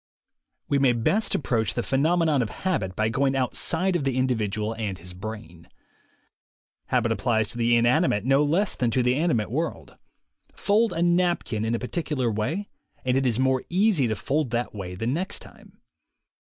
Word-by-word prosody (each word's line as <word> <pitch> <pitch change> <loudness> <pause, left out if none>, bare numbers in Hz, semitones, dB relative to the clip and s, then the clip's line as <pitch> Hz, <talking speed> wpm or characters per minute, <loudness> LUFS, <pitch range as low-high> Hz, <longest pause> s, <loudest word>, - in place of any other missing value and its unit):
We 140 - +1
may 135 -3 +4
best 195 - +1
approach 115 -6 0
the 120 - -1
phenomenon 155 +1 +2
of 115 - -2
habit 105 - -2
by 110 +2 +1
going 135 +3 +1
outside 160 +8 0
of 170 - 0
the 135 -2 -1
individual 110 -4 0
and 105 -4 -4
his 90 +1 -9
brain. 90 -4 -9 1.2
Habit 120 -2 +1
applies 110 0 +1
to 120 - -5
the 120 0 +3
inanimate 120 - +2
no 135 +2 +4
less 170 +7 +1
than 120 - 0
to 125 +2 +1
the 125 +1 +3
animate 140 -9 0
world. 160 +6 -4 0.6
Fold 215 +2 +2
a 165 - 0
napkin 175 -10 +1
in 115 +1 0
a - - -2
particular 130 -3 -2
way 155 - -2 0.4
and 125 0 +2
it 135 0 +2
is 120 -1 0
more 130 -1 +2
easy 185 - +3
to 110 - -1
fold 145 +2 -1
that 120 +1 -2
way 95 -3 -6
the 110 - -4
next 165 - -1
time. - - -14
125 Hz, 175 wpm, -25 LUFS, 110-160 Hz, 1.2 s, may